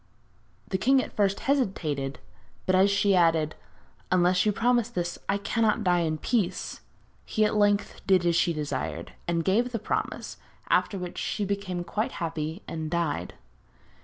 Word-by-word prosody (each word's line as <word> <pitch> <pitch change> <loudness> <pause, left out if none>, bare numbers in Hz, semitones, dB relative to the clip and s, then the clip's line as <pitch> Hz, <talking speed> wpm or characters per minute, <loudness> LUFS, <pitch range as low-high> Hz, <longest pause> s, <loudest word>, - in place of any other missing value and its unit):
The 190 - -1
king 265 +6 +4
at - - -10
first 200 -1 +1
hesitated, 165 - 0 0.5
but 185 - +2
as 190 +2 +5
she 200 0 +3
added: 165 -3 +3 0.6
'Unless 180 +2 +3
you - - +4
promise 240 +1 +2
this 175 -6 -3
I 200 - +2
cannot 220 +2 +1
die 180 -2 +3
in 160 -2 0
peace,' 190 -1 -1 0.4
he 215 - +1
at 210 - +1
length 205 -1 +1
did 185 -3 +4
as 170 -1 +3
she 170 - +3
desired, 85 - -3 0.2
and 170 -1 0
gave 235 +6 +2
the 235 - -1
promise, - - -3 0.3
after 200 - +2
which 180 -1 -5
she 205 - -2
became 195 -3 -3
quite 210 +6 -2
happy 160 +1 -4
and 160 -1 -4
died. 170 -2 -2
185 Hz, 160 wpm, -27 LUFS, 170-205 Hz, 0.6 s, as